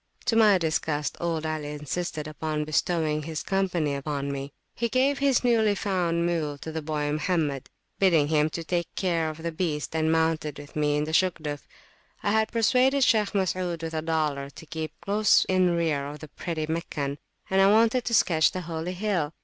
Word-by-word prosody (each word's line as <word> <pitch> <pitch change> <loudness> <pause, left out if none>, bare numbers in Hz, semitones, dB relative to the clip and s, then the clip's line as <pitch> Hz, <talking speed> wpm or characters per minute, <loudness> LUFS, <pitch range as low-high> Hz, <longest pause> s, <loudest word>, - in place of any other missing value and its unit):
To 245 -2 +1
my 215 -3 +6
disgust, 155 -3 -1
old 165 -2 -1
Ali 155 -2 -3
insisted 150 +1 -4
upon 155 0 -3
bestowing 155 0 0
his 155 +1 -5
company 180 -6 0
upon 140 0 -3
me. 140 0 -5 0.2
He 235 0 -1
gave 270 +4 +2
over 280 - -1
his 265 -3 +3
newly 220 -4 +3
found 175 -4 0
mule 160 -4 -1
to 160 - -7
the 160 0 -3
boy 150 -1 -2
Mohammed, 150 -3 -1 0.3
bidding 165 -7 +4
him 155 -1 +3
take 170 +2 -2
care 170 -4 0
of 155 +1 -9
the 170 - -2
beast, 160 -2 -3
and 160 0 +2
mounted 160 -2 0
with 145 0 -11
me 150 -1 +1
in 150 - 0
the 155 +1 -4
Shugduf. 160 -5 0 0.6
I 205 - +1
had 220 0 +2
persuaded 255 +4 +3
Shaykh 215 -4 +2
Masud, 180 -3 -1
with 165 0 -4
a 160 - -1
dollar, 155 -4 -1
to 160 - -13
keep 160 0 -6
close 205 +1 +3
in 185 -2 +2
rear 155 -4 0
of 145 +1 -7
the 150 +1 -11
pretty 160 +1 -4
Meccan; 150 -3 -3 0.3
and 190 0 +4
I 195 - +6
wanted 230 +3 +4
to 230 - +1
sketch 160 -7 +3
the 185 - -3
Holy 165 +1 -4
Hill. 180 -6 -1
160 Hz, 190 wpm, -26 LUFS, 150-185 Hz, 0.6 s, my